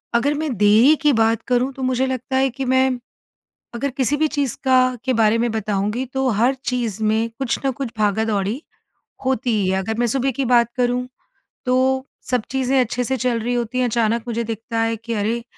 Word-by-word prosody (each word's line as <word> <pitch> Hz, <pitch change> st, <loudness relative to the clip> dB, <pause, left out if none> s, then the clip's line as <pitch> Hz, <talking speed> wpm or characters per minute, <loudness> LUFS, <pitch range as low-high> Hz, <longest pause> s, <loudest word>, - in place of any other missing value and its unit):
अगर 280 Hz, +5 st, +2 dB
मैं 300 Hz, -3 st, -2 dB
देरी 215 Hz, +9 st, +6 dB
की 300 Hz, -1 st, +4 dB
बात 225 Hz, 0 st, +2 dB
करूँ 250 Hz, +2 st, +1 dB
तो 265 Hz, -, -6 dB
मुझे 255 Hz, 0 st, +1 dB
लगता 260 Hz, 0 st, -3 dB
है 265 Hz, 0 st, +3 dB
कि 265 Hz, +2 st, -5 dB
मैं, 260 Hz, 0 st, +2 dB, 0.8 s
अगर 280 Hz, +4 st, -1 dB
किसी 270 Hz, +2 st, 0 dB
भी 310 Hz, +1 st, +2 dB
चीज़ 285 Hz, -5 st, -2 dB
का 255 Hz, -1 st, +3 dB
के 260 Hz, -, +1 dB
बारे 225 Hz, 0 st, +3 dB
में 235 Hz, +1 st, +1 dB
बताऊँगी 210 Hz, +3 st, -1 dB
तो 265 Hz, 0 st, 0 dB
हर 235 Hz, +5 st, +2 dB
चीज़ 230 Hz, -4 st, -2 dB
में 220 Hz, +2 st, +1 dB
कुछ 265 Hz, -3 st, 0 dB
न 270 Hz, -, +2 dB
कुछ 265 Hz, -2 st, -5 dB
भागा-दौड़ी 210 Hz, +3 st, 0 dB, 0.6 s
होती 260 Hz, -2 st, 0 dB
ही 185 Hz, -, 0 dB
है। 190 Hz, 0 st, +1 dB
अगर 220 Hz, +4 st, -3 dB
मैं 240 Hz, -, +2 dB
सुबह 270 Hz, +3 st, 0 dB
की 265 Hz, +2 st, -2 dB
बात 235 Hz, -1 st, +4 dB
करूँ 250 Hz, 0 st, 0 dB, 0.6 s
तो 260 Hz, +1 st, +2 dB, 0.2 s
सब 250 Hz, -3 st, +1 dB
चीज़ें 265 Hz, 0 st, +1 dB
अच्छे 245 Hz, +1 st, -1 dB
से 265 Hz, +3 st, -1 dB
चल 245 Hz, -1 st, 0 dB
रही 245 Hz, +2 st, -1 dB
होती 240 Hz, +1 st, -2 dB
हैं 250 Hz, -, +2 dB
अचानक 230 Hz, 0 st, 0 dB
मुझे 235 Hz, 0 st, -1 dB
दिखता 225 Hz, +1 st, -4 dB
है 225 Hz, 0 st, 0 dB
कि, 230 Hz, +2 st, -7 dB
अरे! 220 Hz, +3 st, -1 dB
245 Hz, 205 wpm, -21 LUFS, 225-260 Hz, 0.8 s, देरी